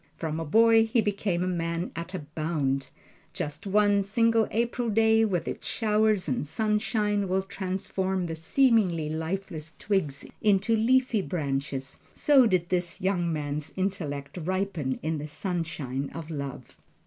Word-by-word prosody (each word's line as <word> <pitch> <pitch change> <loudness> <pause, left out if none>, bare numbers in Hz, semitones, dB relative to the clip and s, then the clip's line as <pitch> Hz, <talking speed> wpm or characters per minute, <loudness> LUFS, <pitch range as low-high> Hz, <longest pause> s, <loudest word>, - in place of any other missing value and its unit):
From 160 -1 -3
a 165 - -3
boy 225 +6 +5
he 225 +2 +2
became 200 -4 0
a - - -1
man 170 -1 -2
at 170 +3 -5
a 160 -5 -5
bound. 145 -4 -1 0.5
Just 150 +6 -5
as - - -4
one 205 0 +4
single 225 +2 +2
April 235 +1 -1
day, 220 +1 +4
with 185 -5 -1
its - - -4
showers 215 -3 +2
and 140 +1 -1
sunshine, 210 +1 0
will 190 +1 +1
transform 190 -1 -2
the 165 - -4
seemingly 175 - +2
lifeless 160 -1 -4
twigs 155 -10 -1 0.2
into 210 +2 +3
leafy 240 0 +3
branches, 140 -6 -3
so 275 -5 +5
did 180 -3 +1
this 175 -2 -1
young 180 -3 0
man's 150 -1 -3
intellect 175 -6 -3
ripen 185 -7 -1
in 160 0 -1
the 150 - -5
sunshine 155 -6 -3
of 165 -1 -6
love. 140 -3 -6
185 Hz, 150 wpm, -27 LUFS, 155-210 Hz, 0.5 s, boy